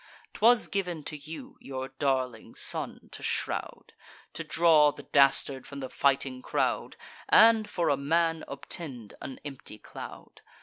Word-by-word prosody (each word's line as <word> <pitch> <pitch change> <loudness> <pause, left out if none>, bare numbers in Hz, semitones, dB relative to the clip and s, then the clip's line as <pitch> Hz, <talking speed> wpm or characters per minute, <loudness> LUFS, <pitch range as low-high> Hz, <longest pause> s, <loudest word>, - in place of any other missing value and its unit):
'Twas 235 +1 +4
giv'n 180 -6 -3
to 150 - -4
you, 155 +2 -9
your 130 -1 -5
darling 130 -4 -1
son - - -2
to - - -8
shroud, - - -3 0.4
To 155 +3 -4
draw 155 -2 +5
the - - -12
dastard 140 -1 +3
from 140 - -8
the 130 -1 -5
fighting 135 -2 +1
crowd, - - -1 0.3
And, 220 -1 +6
for 170 - 0
a 140 - +3
man, 165 +3 +1
obtend 135 -5 -6
an 135 - -7
empty 135 -6 -8
cloud. - - -10
145 Hz, 140 wpm, -29 LUFS, 135-165 Hz, 0.4 s, And